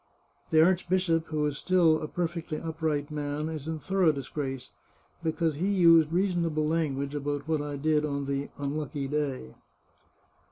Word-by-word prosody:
The 160 0 +6
archbishop, 180 -2 +1
who 155 -1 -1
is 150 -1 -2
still 170 -4 +3
a 155 - -3
perfectly 170 -1 -3
up 160 0 -7
right 150 -2 -1
man, 150 +1 -3
is 155 -2 -6
in 160 0 -2
thorough 185 0 +2
disgrace, 135 -2 -5 0.5
because 165 0 0
he 180 +5 0
used 165 -5 +5
reason 180 0 +1
able 155 -2 0
language 145 -3 -1
about 145 0 -3
what 160 -2 +1
I 145 -1 -4
did 150 +1 +2
on 140 -2 -2
the 140 0 -2
unlucky 145 0 -3
day. 135 - -2
155 Hz, 160 wpm, -28 LUFS, 145-165 Hz, 0.5 s, The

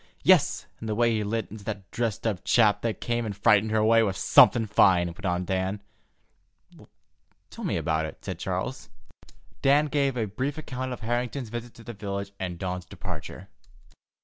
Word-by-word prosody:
"Yes, - - +4
and 110 - -6
the 105 - -1
way 120 +1 +3
he 110 -1 0
lit 110 0 -3
into 105 -1 -9
that 100 -3 -6
dressed 115 -4 -2
up 105 -5 -1
chap 110 -4 +3
that 115 -2 -2
came 120 0 -1
and 105 -3 -5
frightened 105 0 +4
her 110 - +1
away 115 +1 +5
was 100 -4 0
something 115 -2 +6
fine," 95 -4 +4
went 85 +4 -5
on 90 0 -1
Dan. 95 +2 -1 1.7
"Tell - - -9
me - - -1
about 80 -1 0
it," - - -12
said - - -5
Charles. - - -4 0.7
Dan 145 +2 +4
gave 140 -3 0
a 115 - 0
brief 130 +9 -3
account 130 -4 -5
of 125 - -6
Harrington's 120 +2 -2
visit 120 +1 -7
to 115 - -13
the 120 - -7
village 100 -1 -5
and 90 -2 -4
Dawn's 90 0 -4
departure. - - -8
110 Hz, 180 wpm, -26 LUFS, 95-120 Hz, 1.7 s, something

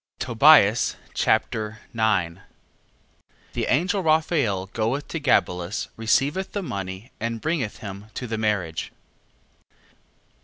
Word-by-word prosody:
Tobias 120 -3 +5 0.2
Chapter 110 0 0 0.2
9 95 -6 0 1.1
The - - -2
angel 180 +8 +1
Raphael 155 - +1
goeth 115 +6 -1
to 165 - -3
Gabelus, 90 - 0
receiveth 135 - 0
the 205 - -2
money, 100 - -6
and 115 0 -3
bringeth 150 -6 -2
him 100 +1 -7
to 125 - -4
the 110 -2 -3
marriage. 100 -7 -1
115 Hz, 105 wpm, -24 LUFS, 100-145 Hz, 1.1 s, Tobias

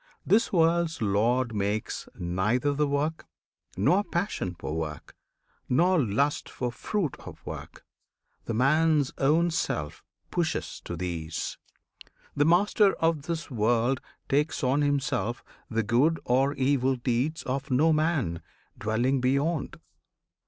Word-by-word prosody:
This 230 +6 +3
world's 165 -2 +2
Lord 115 +4 +1
makes 105 +1 -2
Neither 105 +11 0
the 150 +1 +1
work, 145 +3 -1 0.5
nor 180 - +3
passion 175 - -2
for - - -5
the - - -3
work, 75 -2 -5 0.5
Nor 175 +6 +4
lust 135 +7 0
for 125 -1 -3
fruit 170 - -2
of - - -12
work; - - -8 0.6
the - - -3
man's 150 +3 +3
own 160 +5 +3
self 80 - -2 0.3
Pushes 165 -2 -2
to 85 - -4
these! 85 -2 -4 0.8
The 145 - +3
Master 195 +4 +4
of 160 -3 0
this 165 -2 -3
World 120 +3 +1 0.3
Takes 150 +3 0
on 135 +3 +2
himself 140 -6 0 0.3
the 115 -1 0
good 135 +10 +2
or 135 +3 +2
evil 135 0 +2
deeds 125 +5 -1
Of 135 +1 -3
no 150 +5 +4
man 150 - 0 0.4
dwelling 120 +5 +1
beyond! 140 +5 0
135 Hz, 125 wpm, -27 LUFS, 115-160 Hz, 0.8 s, Nor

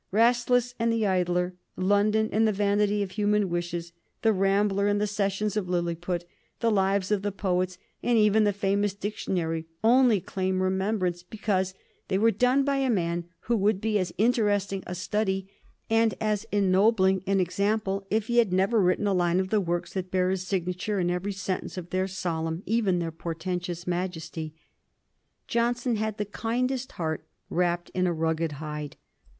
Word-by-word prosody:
"Rasselas" 245 +3 +3
and 230 0 +2
"The 225 -1 +1
Idler," 180 -1 +1 0.2
"London" 205 +3 +2
and 220 +1 +3
"The - - +3
Vanity 205 0 +1
of 190 - -6
Human 205 -1 +1
Wishes," 175 -1 -3 0.3
"The 225 -1 +4
Rambler" 200 +1 +2
and 205 0 +2
the 210 - +1
"Sessions 205 0 -1
of 195 -4 -2
Lilliput," 175 0 -1
and - - -29 0.3
the 230 -1 +2
"Lives 195 -1 +1
of 205 -2 +2
the 205 0 -1
Poets," 185 -2 -1 0.2
and 240 -1 +2
even 215 0 +4
the 205 - +3
famous 200 0 0
"Dictionary," 170 -6 -2 0.2
only 240 -2 +5
claim 185 +1 -2
remembrance 190 -2 0
because 190 -1 -2 0.3
they 190 - +1
were 225 +3 +4
done 250 +6 +3
by 280 0 +1
a 270 -1 +1
man 170 -5 0 0.2
who 235 - 0
would 205 0 +2
be 215 0 +1
as 185 - -2
interesting 205 -4 +1
a 180 - -4
study 190 +1 -1 0.4
and 225 0 +2
as 215 0 -1
ennobling 190 -1 +3
an 195 0 +2
example 195 +1 0
if 215 0 +1
he 240 +1 +2
had 225 -6 +3
never 195 +4 +3
written 185 +3 +2
a 200 - +2
line 175 -1 +2
of 190 0 -1
the 215 0 +2
works 175 -1 -2
that 185 -1 -3
bear 185 0 +1
his 185 -1 -3
signature 185 +2 -1
in 175 -1 +1
every 180 +3 -2
sentence 190 -1 -4
of 175 -1 -7
their 185 +1 0
solemn, 165 -2 -3
even 210 -5 +1
their 170 -1 -2
portentous 175 +1 -4
majesty. 165 -3 -4 0.9
Johnson 240 0 0
had 220 0 -2
the 210 - -1
kindest 245 +5 -2
heart 160 -2 -3 0.3
wrapped 175 0 0
in 185 0 +1
a 175 - +1
rugged 160 -1 -1
hide. 150 0 -6
195 Hz, 175 wpm, -27 LUFS, 180-215 Hz, 0.9 s, only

